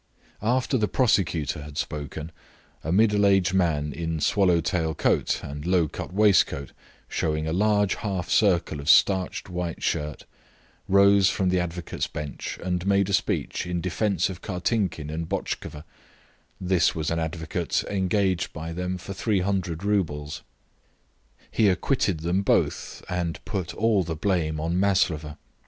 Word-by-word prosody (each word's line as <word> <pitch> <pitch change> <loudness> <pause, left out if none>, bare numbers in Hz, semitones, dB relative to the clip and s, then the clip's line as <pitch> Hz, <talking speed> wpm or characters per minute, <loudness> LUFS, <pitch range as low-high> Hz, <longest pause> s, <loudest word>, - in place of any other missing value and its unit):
After 125 +4 +1
the 105 - +2
prosecutor 85 - +1
had 75 0 -9
spoken, 75 +2 -4 0.5
a 80 - -2
middle 105 +1 +4
aged 95 -3 +3
man 75 -6 +1
in 80 -1 -3
swallow 90 +1 +3
tail 80 -1 -1
coat - - +1
and 75 +1 -6
low 90 -1 +2
cut - - -7
waistcoat 95 -8 +3 0.4
showing 80 0 -1
a 80 - -1
large 105 +1 +2
half 95 -5 -3
circle 85 -7 +2
of 70 - -4
starched 95 -2 +3
white 90 -2 -4
shirt, 75 -1 -2 0.6
rose 100 0 +5
from 95 -1 0
the 90 0 +2
advocates' 90 -1 -3
bench 75 -1 -6
and 90 0 -2
made 100 0 +3
a - - -1
speech 95 -5 -1
in 90 -1 -1
defence 90 +1 0
of 90 -2 -7
Kartinkin 90 -5 -2
and 80 +1 -4
Botchkova; 90 -5 -4 0.8
this 90 0 +2
was 80 -1 -2
an 85 - 0
advocate 80 -3 -2
engaged 95 -2 0
by 80 +1 -6
them 90 +1 -3
for 95 +2 -7
300 95 -4 -1
roubles. 80 -8 -1 1.1
He 110 - +3
acquitted 95 - 0
them 85 +4 +1
both - - 0
and 85 -2 -2
put 95 -4 -4
all 110 -3 +2
the 80 -2 -3
blame 80 -3 0
on 85 +3 -1
Maslova. 80 -6 +1
90 Hz, 145 wpm, -25 LUFS, 80-100 Hz, 1.1 s, rose